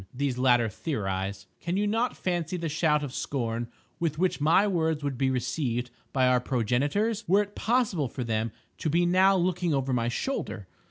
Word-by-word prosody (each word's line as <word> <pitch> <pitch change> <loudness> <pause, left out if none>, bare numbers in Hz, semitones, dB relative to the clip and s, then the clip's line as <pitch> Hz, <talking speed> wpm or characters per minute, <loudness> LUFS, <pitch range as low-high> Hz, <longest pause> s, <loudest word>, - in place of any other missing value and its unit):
These 130 -1 -2
latter 120 -2 +4
theorize. 95 - -3
Can 175 +2 -2
you 205 - +1
not 225 +4 0
fancy 175 -1 -1
the 165 -2 -3
shout 150 -1 +2
of 135 -3 -5
scorn 120 -4 -2 0.3
with 160 -3 -1
which 180 -3 0
my 165 +7 +5
words 160 -6 0
would 140 -2 -1
be 130 +2 +1
received 125 -2 -1 0.2
by 130 -1 +2
our 125 0 +4
progenitors 140 - 0
were 195 +4 +4
it 205 0 -13
possible 215 - +1
for 125 +2 -5
them 110 -1 -1 0.3
to 155 - -1
be 170 +3 +3
now 190 +2 +5
looking 180 -3 +1
over 135 -1 0
my 120 -1 +1
shoulder? 120 - -3
145 Hz, 180 wpm, -28 LUFS, 125-180 Hz, 0.3 s, my